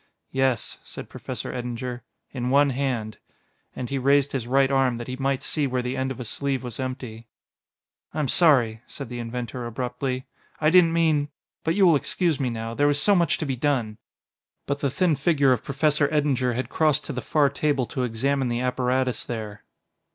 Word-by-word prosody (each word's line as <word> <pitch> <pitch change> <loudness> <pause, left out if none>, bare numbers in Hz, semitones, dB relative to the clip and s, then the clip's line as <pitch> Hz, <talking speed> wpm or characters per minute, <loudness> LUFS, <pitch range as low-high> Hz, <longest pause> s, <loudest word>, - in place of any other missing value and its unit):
"Yes," 130 -3 0
said - - -9
Professor - - -6
Eddinger, 125 0 -4 0.3
"in 125 -2 -3
one 140 +1 +4
hand." 125 -5 -2 0.6
And 125 - -4
he 135 - 0
raised 140 +1 +3
his 125 -4 -3
right 135 +2 +3
arm 135 -3 +2
that 120 - -6
he 130 - -4
might 135 0 -1
see 150 -3 0
where 125 -1 -1
the 125 +1 -2
end 130 0 -1
of 130 - -6
a 125 - -5
sleeve 135 +4 -2
was 120 -1 -6
empty. 125 -3 -5 0.8
"I - - -8
am 150 -2 +1
sorry," 125 -8 +4
said - - -7
the 120 -1 -5
inventor 120 +1 -5
abruptly; 125 +2 -3 0.3
"I 155 0 +3
didn't 180 -2 +6
mean... 155 -3 +2 0.3
but 160 - +1
you 200 -1 +5
will 170 -3 +6
excuse 165 +2 0
me 130 -3 0
now; 115 0 -4
there 145 +4 +3
is 145 0 +2
so 205 - +4
much 170 -5 +2
to - - -3
be 135 -2 -1
done 120 -5 -1 0.3
" - - -59
But 140 0 -2
the 140 - 0
thin 170 +3 +2
figure 140 -1 +3
of 125 - +1
Professor 145 +1 +1
Eddinger 135 -5 +1
had 130 - -2
crossed 155 -3 +1
to - - -5
the 125 - -3
far 145 +1 +2
table 140 -2 0
to 130 - -4
examine 130 +3 0
the 120 0 -1
apparatus 125 0 0
there. 110 -3 -6
130 Hz, 200 wpm, -25 LUFS, 125-145 Hz, 0.8 s, didn't